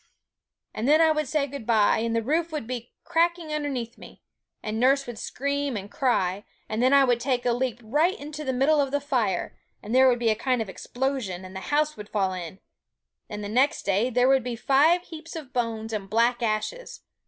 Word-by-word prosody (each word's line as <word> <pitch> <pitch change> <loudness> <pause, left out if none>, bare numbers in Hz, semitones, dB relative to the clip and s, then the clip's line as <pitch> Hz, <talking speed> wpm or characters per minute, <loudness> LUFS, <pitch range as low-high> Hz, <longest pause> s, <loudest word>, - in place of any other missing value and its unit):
And 220 +4 -2
then 305 +2 +5
I 320 -1 +5
would 305 -2 -1
say 300 +1 +1
good 280 -4 -8
bye; 220 -3 +4
and 230 0 -1
the 230 - 0
roof 320 +6 0
would 305 -7 -4
be 240 -1 -6
cracking 340 -1 0
underneath 270 -6 -3
me; - - -14 0.4
and 215 +1 -3
nurse 275 +3 +3
would 240 -3 -7
scream 280 -2 -2
and 200 0 -8
cry; 200 -7 0 0.2
and 220 +2 -2
then 255 +1 +4
I 280 0 +6
would 245 -3 +2
take 250 -1 -1
a 240 - +3
leap 245 -1 -2
right 300 - +1
into 300 +2 -7
the 265 - -1
middle 280 +4 +3
of 275 - 0
the 285 +1 0
fire; 245 - -1 0.3
and 215 - -5
there 260 +1 +6
would 245 - +2
be 235 -1 +1
a - - +1
kind 255 +2 0
of 220 -3 -3
explosion, 245 -5 -3
and 185 +1 -11
the - - -4
house 300 +1 +1
would 210 0 -9
fall 195 -3 0
in; 180 0 -7 0.7
and 210 0 -6
the - - -4
next 260 +6 +2
day 200 +5 +1
there 250 +1 +3
would 265 -2 +4
be 245 -1 -3
five 295 +9 +3
heaps 330 -1 -10
of 295 -5 -8
bones 225 -2 -2
and 200 -2 -4
black 235 +3 +2
ashes! 230 - -3
250 Hz, 220 wpm, -26 LUFS, 220-285 Hz, 0.7 s, I